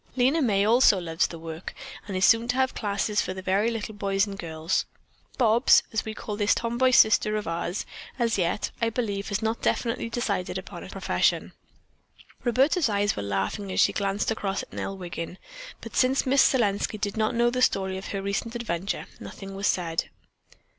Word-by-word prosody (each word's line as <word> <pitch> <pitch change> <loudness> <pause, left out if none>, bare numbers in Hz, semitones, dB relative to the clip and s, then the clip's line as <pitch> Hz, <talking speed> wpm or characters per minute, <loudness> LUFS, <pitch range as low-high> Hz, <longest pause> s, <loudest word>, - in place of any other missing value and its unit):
Lena 265 +6 +3
May 205 -6 +2
also 225 -3 +5
loves 165 -2 0
the 170 - -8
work, 165 +1 -7 0.3
and 195 -2 -3
is 185 - +4
soon 230 +1 +4
to 245 - 0
have 260 0 +1
classes 205 -1 0
for 185 - -4
the 190 - -6
very 195 +4 +2
little 225 -2 -4
boys 200 -1 +1
and 200 -1 -7
girls. 160 -2 -2 0.5
Bobs, 235 0 +5
as 220 - 0
we 220 0 -6
call 210 - -5
this 205 +1 +2
tom 235 +1 -2
boy 260 0 +5
sister 220 -3 +5
of 210 - -4
ours, 170 +3 -3 0.3
as 235 -3 +1
yet, 180 +1 -1
I 230 - +2
believe, 205 -4 -3
has 205 +1 -2
not 220 +1 -1
definitely 230 -1 -1
decided 205 -6 -2
upon - - -8
a - - -10
profession." - - 0 0.9
Roberta's 270 - +2
eyes 205 0 +1
were - - -3
laughing 100 - -2
as - - -1
she - - +4
glanced 200 +1 -1
across 200 -3 -2
at - - -14
Nell 195 - -4
Wiggin, 175 -1 -6 0.4
but - - -9
since 260 +1 +3
Miss 270 +1 +4
Selenski 215 -3 +2
did 205 -1 -2
not 220 +2 0
know 240 +1 +3
the 255 +1 -1
story 190 -5 +1
of 190 - -8
her 195 -1 -4
recent 200 +4 -2
adventure, 200 -5 -3
nothing 195 -1 -9
was 195 +1 -1
said. 165 -3 -1
205 Hz, 195 wpm, -26 LUFS, 190-230 Hz, 0.9 s, also